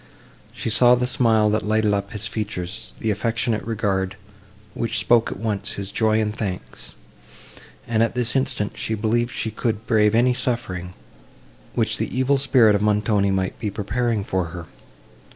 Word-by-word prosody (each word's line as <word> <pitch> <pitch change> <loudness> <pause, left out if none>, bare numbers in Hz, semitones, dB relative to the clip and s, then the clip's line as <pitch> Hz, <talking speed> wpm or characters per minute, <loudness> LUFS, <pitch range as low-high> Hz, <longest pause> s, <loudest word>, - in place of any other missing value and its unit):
She 115 - -3
saw 120 +2 +6
the 125 0 0
smile, 115 -4 +2
that 110 0 0
lighted 110 0 +1
up 100 0 -2
his 105 -1 -5
features—the 105 0 -4
affectionate 110 +1 -1
regard, 100 -4 -1 0.6
which 115 - -2
spoke 120 -1 +3
at - - -5
once 105 -1 -2
his 100 0 -5
joy 110 -1 +2
and 105 -1 -1
thanks; 95 -5 -6 0.9
and, 115 -1 +1
at 115 +1 +1
this 120 -1 0
instant, 120 -6 0
she 110 - -1
believed 115 +3 0
she 110 - -3
could 115 -2 -2
brave 105 -2 +3
any 125 +2 +4
suffering, 115 -8 -3 0.8
which - - 0
the - - -3
evil 135 +2 +2
spirit 125 -6 +5
of 100 - +1
Montoni 105 -1 +2
might 95 -1 -1
be 110 - -2
preparing 110 +2 -1
for 95 -2 -1
her. 85 +1 -8
110 Hz, 160 wpm, -22 LUFS, 100-115 Hz, 0.9 s, saw